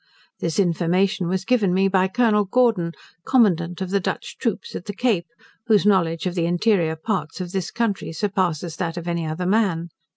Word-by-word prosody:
This 165 -2 -2
information 185 +1 +1
was 190 +1 -1
given 205 -7 +2
me 195 +1 +3
by 190 -1 +2
Colonel 210 -1 +2
Gordon, 195 -6 +2 0.3
commandant 180 -8 +2
of 190 -1 -3
the 200 - +2
Dutch 180 - -4
troops 230 -5 -2
at - - -6
the 205 - -6
Cape, 210 -9 0 0.4
whose 210 -3 +4
knowledge 170 -5 +2
of 180 - -1
the 170 -2 0
interior 175 -2 +2
parts 175 -1 -3
of 180 -1 -5
this 190 -2 -2
country 230 -7 -2
surpasses 175 -3 -1
that 170 -1 -3
of 170 0 -5
any 170 -2 -1
other 160 +3 -3
man. 185 -4 +1
185 Hz, 185 wpm, -22 LUFS, 170-205 Hz, 0.4 s, whose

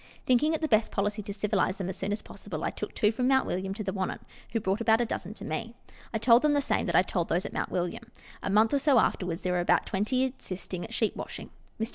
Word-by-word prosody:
Thinking 295 +6 +3
it 315 - -4
the 315 - +1
best 220 -4 +3
policy 205 +1 -1
to 205 0 -6
civilize 200 -1 0
them 190 - -3
as 190 - -4
soon 195 +1 -3
as 205 - -2
possible, - - -7
I - - 0
took - - -6
two 210 -1 +3
from 250 +3 0
Mount 265 0 +4
William 190 +1 -2
to 215 - -4
the 190 -1 -2
Wannon, 190 -2 -2 0.3
who 225 - 0
brought 200 +1 -1
about 225 -1 +4
a 240 - +2
dozen 210 -2 -5
to - - -9
me. 225 +10 -4 0.4
I 220 - 0
told 230 +2 +6
them 300 -1 +3
the 290 - +3
same 280 - 0
that - - 0
I - - +6
told 175 -2 -2
those 175 +2 +1
at - - -6
Mount - - -2
William. 180 +5 -2 0.4
A - - -3
month 215 +4 +4
or 285 - +4
so 280 -2 +4
afterwards 180 -6 +1
there 180 - 0
were 180 - +1
about 175 0 +3
twenty 255 +6 0
assisting 185 -1 -5
at - - -8
sheep 225 -2 0
washing. - - -7 0.3
Mr. 225 +1 -1
210 Hz, 270 wpm, -29 LUFS, 190-235 Hz, 0.4 s, told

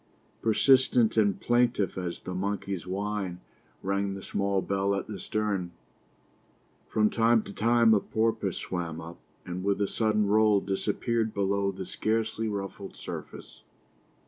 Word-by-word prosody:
Persistent 125 0 +4
and 105 -3 +3
plaintive 120 -5 +2
as 90 -2 -4
the 90 - -6
monkey's 95 -2 -3
whine 100 -1 -3 0.4
rang 100 0 -1
the 95 - -8
small 100 -1 0
bell 100 +1 0
at 100 - -3
the 105 -3 -7
stern. 100 -5 -2 1.1
From 105 -1 +2
time 115 -1 +3
to 100 - -9
time 115 +1 +4
a 105 - +5
porpoise 110 -3 -1
swam 85 -3 -4
up, 85 +1 -9 0.3
and 90 +1 -5
with 100 0 +1
a 100 - +1
sudden 105 -1 +1
roll 105 0 +4
disappeared 110 +3 -1
below 100 0 +1
the 95 - -6
scarcely 110 +2 -1
ruffled 100 -1 -5
surface. - - -8
100 Hz, 140 wpm, -28 LUFS, 95-110 Hz, 1.1 s, a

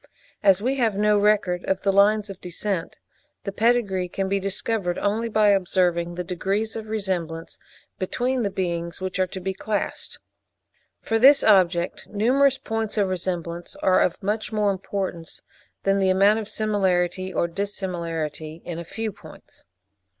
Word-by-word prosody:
As 195 -1 +4
we 265 +3 0
have 225 -5 +1
no 210 0 +3
record 200 -4 +2
of 190 0 -1
the 195 -1 +2
lines 205 +1 +3
of 195 - -12
descent, 180 0 -3 0.5
the 200 - -3
pedigree 200 -5 +1
can 195 +2 -2
be 195 +1 0
discovered 195 -1 -1
only 220 +3 0
by 215 -1 +4
observing 175 -3 +1
the 180 - -3
degrees 195 +5 -2
of 220 -1 -6
resemblance 180 -6 -3 0.4
between 245 +7 -1
the 205 - 0
beings 170 -3 -3
which 185 0 -4
are 185 - +2
to 190 - -7
be 190 +1 -3
classed. 205 +2 -3 0.9
For 225 0 0
this 275 +4 +7
object 180 -4 +3
numerous 260 +6 +3
points 225 -2 -3
of 200 -2 +2
resemblance 175 -2 -4
are 185 - +4
of 180 - 0
much 210 +2 -2
more 210 -2 +2
importance 190 -3 -5 0.4
than 195 0 +2
the 190 -1 +2
amount 200 +3 +4
of 215 -1 -6
similarity 190 -3 0
or 170 - 0
dissimilarity 170 -4 -4
in 170 -1 -5
a - - -5
few 220 +5 -4
points. - - -15
195 Hz, 155 wpm, -24 LUFS, 180-215 Hz, 0.9 s, this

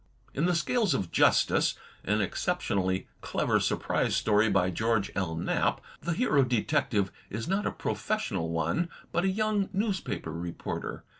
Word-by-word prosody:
In 150 - 0
"The 180 0 +2
Scales 215 +3 +2
of 95 -4 -2
Justice," - - +3 0.3
an 105 +2 +1
exceptionally 95 - -1
clever - - +1
surprise - - 0
story 105 +1 +3
by 95 -2 +2
George 110 +2 0
L. 90 -5 -1
Knapp, 80 - 0 0.2
the 170 +2 -1
Hero 155 - +3
Detective 105 -5 +1 0.2
is 110 +2 -4
not 195 +3 0
a - - 0
pro - - -2
fessional 80 0 -2
one, 85 - 0 0.2
but 175 - +1
a - - +3
young 210 0 0
newspaper 195 - -2
reporter. 85 0 -5
110 Hz, 150 wpm, -29 LUFS, -, 0.3 s, Justice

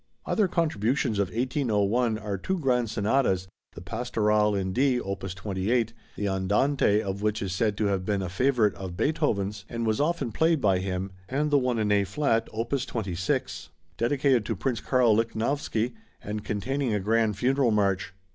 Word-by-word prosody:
Other 210 -4 +2
contributions 135 - 0
of 100 - +2
1801 115 -1 0
are 105 -1 -4
two 185 - -2
grand 125 -7 +1
sonatas, 100 -4 +1 0.3
the - - -10
"Pastorale" 105 -1 +1
in 95 -1 -1
D, 130 0 +2
opus 95 -3 -5
28, 105 +5 -1 0.2
the 105 - -2
Andante 105 +4 +2
of 100 0 -4
which 105 0 0
is 95 -2 -3
said 105 +1 0
to 105 - 0
have 100 -2 0
been 100 0 -1
a - - -2
favorite 110 +2 +2
of 90 -2 -7
Beethoven's 105 -10 0
and 115 -1 -3
was 110 +3 +1
often 160 -6 0
played 160 +6 +2
by 95 -6 +2
him, 95 0 -3 0.2
and 150 +3 0
the 145 - +5
one 125 -2 0
in 105 -2 +1
A 100 -1 +4
flat, 115 +3 0
opus 120 +4 -1
26, 95 - -3 0.3
dedicated 130 +1 +2
to 115 - -2
Prince 115 +4 -1
Karl 125 -4 +3
Lichnowsky 115 +1 -1 0.3
and 105 0 -5
containing 115 +4 -1
a - - +1
grand 110 +1 +1
funeral 130 +2 +2
march. 100 -3 +1
110 Hz, 170 wpm, -27 LUFS, 100-130 Hz, 0.3 s, the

